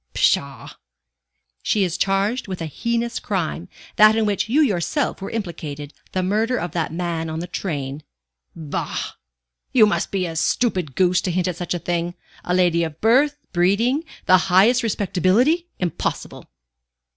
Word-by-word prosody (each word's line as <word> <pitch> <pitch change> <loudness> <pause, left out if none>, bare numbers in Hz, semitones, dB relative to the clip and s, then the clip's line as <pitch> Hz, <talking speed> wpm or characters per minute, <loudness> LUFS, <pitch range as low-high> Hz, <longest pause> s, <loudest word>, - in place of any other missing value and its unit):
Psha!" - - 0 0.8
"She 210 - +1
is 180 -2 -1
charged 200 +6 0
with 185 -2 -5
a 165 - -3
heinous 235 - -2
crime 180 -2 -3 0.3
that 215 +1 +7
in 225 -1 +2
which 205 +1 0
you 285 +7 +4
yourself 210 - -1
were 195 - -4
implicated 155 -8 -5 0.2
the 185 - -1
murder 220 +6 +1
of 175 - -4
that 165 -3 -2
man 165 -1 -3
on 160 - -4
the 170 - -4
train." 150 -6 -4 0.5
"Bah! 155 -3 -4 0.6
You 230 -4 +6
must 175 -4 0
be 190 -2 -1
a 165 -2 -5
stupid 180 - 0
goose, 180 -1 +3
to 185 - -2
hint 180 +1 0
at 180 - -2
such 175 0 -3
a - - 0
thing! 175 0 -2 0.3
A 180 - 0
lady 175 -2 +3
of 160 -1 -5
birth, 275 +6 +3 0.2
breeding, 210 - +2 0.2
the 185 0 +6
highest 210 +8 +5
respectability 220 - +1
impossible!" 175 -4 -4
185 Hz, 155 wpm, -22 LUFS, 170-220 Hz, 0.8 s, that